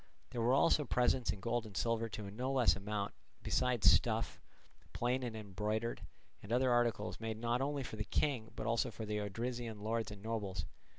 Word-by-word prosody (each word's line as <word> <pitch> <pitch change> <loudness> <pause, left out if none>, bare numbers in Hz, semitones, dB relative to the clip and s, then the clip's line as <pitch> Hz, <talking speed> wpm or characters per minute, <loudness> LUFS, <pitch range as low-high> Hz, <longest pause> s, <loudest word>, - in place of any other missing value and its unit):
There 120 - -2
were 120 +2 +3
also 150 +1 +4
presents 125 -2 +2
in 100 -1 -2
gold 120 +2 0
and 105 -4 -8
silver 115 -1 +1
to 105 0 -6
a 100 - -7
no 125 +6 -2
less 130 -3 +4
amount, 100 +1 -3 0.3
besides 120 -6 +4
stuff, 115 -1 +1 0.5
plain 125 +2 +1
and 120 -3 -3
embroidered, 110 +2 -2 0.4
and 100 - -9
other 125 +1 +3
articles, 120 -3 +1
made 110 -1 -3
not 120 +2 0
only 140 0 -1
for 110 - -6
the 105 - -1
king, 125 -4 0
but - - -4
also 115 -1 +2
for 110 - -6
the 105 0 -1
Odrysian 115 +1 -3
lords 110 0 0
and 105 -1 -9
nobles. 100 -7 -2
115 Hz, 190 wpm, -36 LUFS, 105-120 Hz, 0.5 s, also